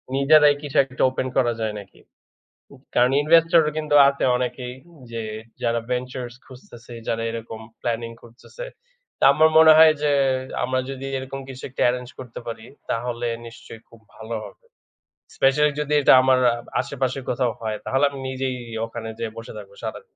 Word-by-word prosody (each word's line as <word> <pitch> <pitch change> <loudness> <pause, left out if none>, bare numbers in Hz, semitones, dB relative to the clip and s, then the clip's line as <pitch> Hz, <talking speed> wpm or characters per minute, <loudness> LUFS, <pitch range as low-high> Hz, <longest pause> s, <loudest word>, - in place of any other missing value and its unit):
নিজেরাই 145 +1 +5
কিছু 145 -2 -4
একটা 130 -1 -3
ওপেন 130 0 -3
করা 120 -2 +2
যায় 110 -1 -2
নাকি?" 100 -1 -15 1.0
কারণ 125 +1 +4
ইনভেস্টর 165 +2 +5
ও - - -1
কিন্তু 155 -1 -1
আছে 140 0 -1
অনেকেই 125 0 -4 0.4
যে 115 - -4 0.4
যারা 115 -1 0
ভেঞ্চারস 125 -1 -4
খুঁজতেছে, 120 -2 -13
যারা 115 0 -1
এরকম 115 -1 -7 0.2
প্ল্যানিং 115 0 -3
খুঁজতেছে। 120 - -11 0.5
তো - - +1
আমার 155 +2 +5
মনে 160 0 +9
হয় 160 -1 +8
যে 150 -1 +2 0.5
আমরা 130 +1 0
যদি 135 0 -6
এরকম 135 +1 -7
কিছু 130 0 -9
একটা 130 - -4
এরেঞ্জ 125 0 -2
করতে 125 -3 -9
পারি, 115 -1 -7 0.2
তাহলে 120 +1 -2 0.2
নিশ্চয়ই 115 -1 -12
খুব 115 - -18 0.2
ভালো 110 +1 -7
হবে। - - -14 0.7
স্পেশালি 150 +2 +3
যদি 150 0 -2
এটা - - +6
আমার 130 0 +4 0.2
আ - - -3 0.3
আশেপাশে 130 -1 -3
কোথাও 125 -1 0
হয়, 110 -1 -3
তাহলে 135 +2 0
আমি 140 -1 -9
নিজেই 130 -1 -3 0.3
ওখানে 115 0 -7
যে - - -2
বসে 115 - -9
থাকবো 100 -1 -11
সারাদিন। - - -7
125 Hz, 165 wpm, -23 LUFS, 115-140 Hz, 1.0 s, মনে